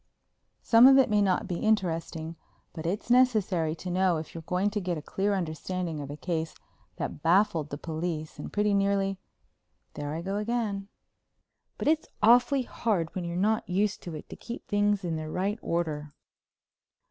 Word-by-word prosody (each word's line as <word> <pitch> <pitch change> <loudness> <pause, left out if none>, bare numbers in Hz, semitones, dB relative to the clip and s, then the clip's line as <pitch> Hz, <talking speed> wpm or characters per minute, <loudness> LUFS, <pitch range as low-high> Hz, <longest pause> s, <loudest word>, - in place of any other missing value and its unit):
Some 230 +2 +7
of 270 0 +8
it 265 -5 +4
may 210 -1 +4
not 190 -2 +1
be 175 - -3
interesting, 165 -6 -1 0.4
but 160 0 -5
it's 205 +6 -2
necessary 210 -11 +3
to 180 +2 -6
know 185 -1 +2
if 155 -1 -7
you're 165 - -6
going 180 +5 0
to 210 0 -2
get 180 -2 -2
a - - -5
clear 200 +4 0
understanding 170 -1 -3
of 140 - -7
a 145 - -6
case 165 -1 -3 0.4
that - - -5
baffled 170 -3 +3
the 145 - -5
police 160 0 -4
and - - -6
pretty 210 0 +1
nearly.... 195 -1 +1 0.7
There 145 +1 -4
I 165 - -4
go 195 +2 -2
again. 210 -3 -2 0.9
But - - -3
it's 315 +1 +2
awfully 245 +4 +5
hard 200 -9 -1
when 180 -2 -3
you're 170 0 -3
not 215 +3 +1
used 200 +3 0
to 170 -3 -7
it 150 - -8
to - - -8
keep 235 - -8
things 205 -1 +1
in 165 -2 -2
their 155 0 -5
right 195 +6 -1
order. 150 -4 -2
185 Hz, 180 wpm, -28 LUFS, 165-210 Hz, 0.9 s, of